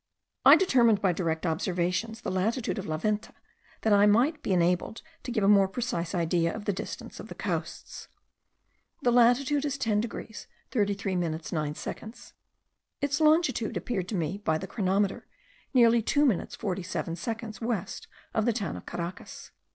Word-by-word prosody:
I - - +10
determined 235 - +4
by 190 -3 +2
direct 165 -1 -2
observations 180 +6 -1
the - - -3
latitude 220 +5 -1
of 190 - -6
La 155 -1 -1
Venta, 210 +5 -2 0.5
that 220 - +3
I 205 0 +6
might 250 +10 +3
be - - -3
enabled 180 +4 +1 0.2
to - - -7
give 220 -4 0
a - - +4
more 200 -1 +6
precise 190 -5 -3
idea 170 0 +1
of 210 - -7
the 205 - +1
distance - - -7
of - - -8
the - - -9
coasts. - - -5 1.0
The 245 - +4
latitude 245 +4 +4
is 285 -2 -2
10 215 -5 +1
degrees 225 -1 -7 0.2
33 200 -3 0
minutes 165 -2 -3
9 150 -3 -2
seconds. 220 +7 -8 0.7
Its 285 +1 -1
longitude 305 -7 +3
appeared 190 -7 -3
to 210 - -3
me 175 +3 -2
by 160 -6 0
the 190 - -6
chronometer, 195 0 -1 0.4
nearly 235 -3 +5
2 290 +6 +2
minutes 230 -11 0
47 180 -5 -3
seconds 220 +2 -5
west 225 -5 -3 0.3
of 220 - +1
the 235 - +3
town 210 -3 -3
of - - -10
Caracas. 170 +1 -7
205 Hz, 165 wpm, -28 LUFS, 180-235 Hz, 1.0 s, I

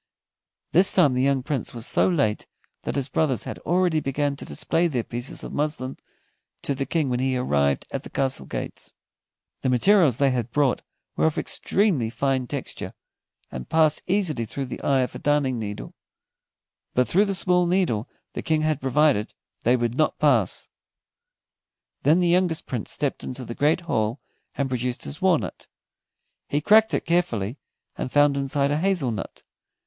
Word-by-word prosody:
This 185 +4 +5
time 160 -8 +5
the 125 - +1
young 135 -1 +2
Prince 135 -4 -3
was 115 -1 -4
so - - +3
late 140 -12 0 0.3
that - - -4
his 140 -2 -1
brothers 135 -4 +1
had - - -6
already 175 -2 +1
begun 140 0 -1
to - - -7
display 170 +1 0
their 130 -8 -1
pieces 120 +3 -4
of - - -7
muslin 145 -3 -2 0.7
to 140 - 0
the 135 0 -3
King 160 -4 0
when 125 -1 0
he 130 0 +1
arrived 70 - +1
at - - -3
the - - -11
castle 130 - -2
gates. - - -6 0.7
The 130 - 0
materials 145 - +4
they 140 -1 +3
had 125 -2 -2
brought 140 0 +1 0.3
were - - +3
of 160 - -2
extremely 180 - +1
fine 130 +1 -1
texture, - - -5 0.6
and 65 -1 -7
passed 155 -2 +3
easily 180 - +1
through 135 +5 -4
the 125 - -7
eye 135 -2 +2
of 125 - -2
a - - -7
darning 145 -4 +1
needle, 105 -2 -6 1.0
but 125 0 +3
through 200 +4 +3
the 200 -1 -1
small 180 -1 +3
needle 170 - 0 0.2
the - - -4
King 155 -1 +1
had 155 -2 0
provided 135 -4 +2 0.3
they 120 +2 +5
would 120 -1 -1
not 155 +2 +1
pass. 125 -11 +2 1.3
Then 150 +5 +4
the 180 -1 +2
youngest 175 -2 +2
Prince 120 -5 -4
stepped 145 -2 -2
into 130 0 -6
the 115 - -6
great 150 +7 +2
hall 120 -6 -1 0.4
and 140 - 0
produced 125 -1 -2
his 70 - -7
walnut. - - 0 0.8
He 145 - +1
cracked 220 +7 +5
it - - -2
carefully, 145 - 0 0.4
and 130 - -3
found 145 -1 +4
inside 140 +1 0
a 150 - +1
hazel 175 -8 +1
nut. 105 - -6
140 Hz, 175 wpm, -24 LUFS, 125-160 Hz, 1.3 s, This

